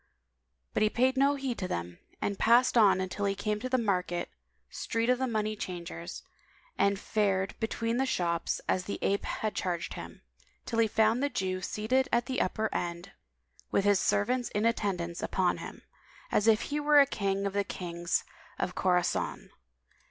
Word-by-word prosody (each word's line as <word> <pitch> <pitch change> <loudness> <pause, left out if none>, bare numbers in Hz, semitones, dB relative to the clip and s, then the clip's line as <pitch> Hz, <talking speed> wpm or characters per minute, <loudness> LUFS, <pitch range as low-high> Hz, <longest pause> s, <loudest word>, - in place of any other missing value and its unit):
But - - 0
he 215 - +4
paid 255 +4 +2
no 275 +2 +3
heed 270 -3 -3
to 185 - -2
them 85 - -4 0.2
and 200 - -2
passed 240 +3 +5
on 195 -4 +5
till 205 +2 -3
he 195 0 +1
came 210 +1 -1
to 255 +4 -4
the 255 - +2
market 180 -6 -1 0.4
street 230 +2 0
of 250 - +1
the 260 - 0
money 215 -2 -1
changers 170 - -6 0.5
and 200 0 +2
fared 195 -3 0
between 230 +1 -1
the 265 +1 +1
shops, 170 -6 0
as 185 -1 +1
the 200 - -3
ape 200 +1 +1
had 215 -1 -2
charged 175 -2 -2
him, - - -9 0.4
till 230 - -2
he 225 - +5
found 220 +3 +2
the 285 - +1
Jew 190 -7 -2
seated 235 +7 0
at 235 0 +2
the 260 0 -1
upper 220 +4 0
end, 175 +2 -3 0.6
with 200 - +1
his 205 -2 +4
servants 245 +4 +1
in 210 +2 +1
attendance 185 -7 -1
upon 180 -2 +1
him, - - -9 0.5
as 210 - +2
he 225 +7 +3
were 295 0 +5
a 280 - +8
King 200 -4 -1
of 200 - -2
the 200 0 +1
Kings 175 -3 -2 0.3
of 180 - -2
Khorason. 180 -2 0
205 Hz, 175 wpm, -30 LUFS, 185-235 Hz, 0.6 s, a